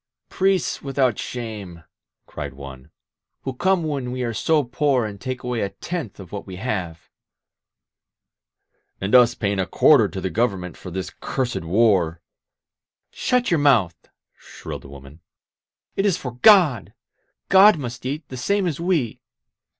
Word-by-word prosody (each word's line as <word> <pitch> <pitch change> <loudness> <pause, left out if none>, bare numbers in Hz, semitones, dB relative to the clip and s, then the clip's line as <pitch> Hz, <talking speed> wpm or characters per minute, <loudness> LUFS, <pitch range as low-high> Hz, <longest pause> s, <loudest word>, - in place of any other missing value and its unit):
"Priests 190 -1 0
without 135 -4 0
shame," 105 -9 -6 0.4
cried - - -7
one, 70 0 -11 0.5
"who 135 - -3
come 185 +6 +1
when 140 -5 -3
we 125 0 -3
are 115 -1 -2
so 155 +6 +2
poor 130 -1 +1
and 100 -2 -7
take 130 -1 -5
away 125 -1 -2
a 100 - -1
tenth 160 - -6
of 95 -3 -11
what 100 -1 -7
we 95 - -7
have 90 -6 -4 0.9
!" - - -53
"And 95 +4 -3
us 120 -1 +6
paying 100 -2 -1
a 95 - 0
quarter 130 -9 +5
to 95 - -6
the 95 -1 -3
Government 95 -4 -1
for 90 - -10
this 95 +1 -5
cursed 130 -3 -2
warP'... 90 -3 +2 0.9
"Shut 250 -4 0
your 170 - +3
mouth 120 - +2 0.2
!" - - -59
shrilled - - -9
the 70 - -13
woman. 70 +2 -13 0.8
"It 195 - +1
is 185 -4 +1
for 125 - -6
God! 150 - +4 0.6
God 195 0 +7
must 120 -4 -6
eat, 145 +3 -4
the 130 - -7
same 200 +10 0
as 165 -4 -2
we. 170 -10 -1
120 Hz, 160 wpm, -22 LUFS, 95-145 Hz, 0.9 s, God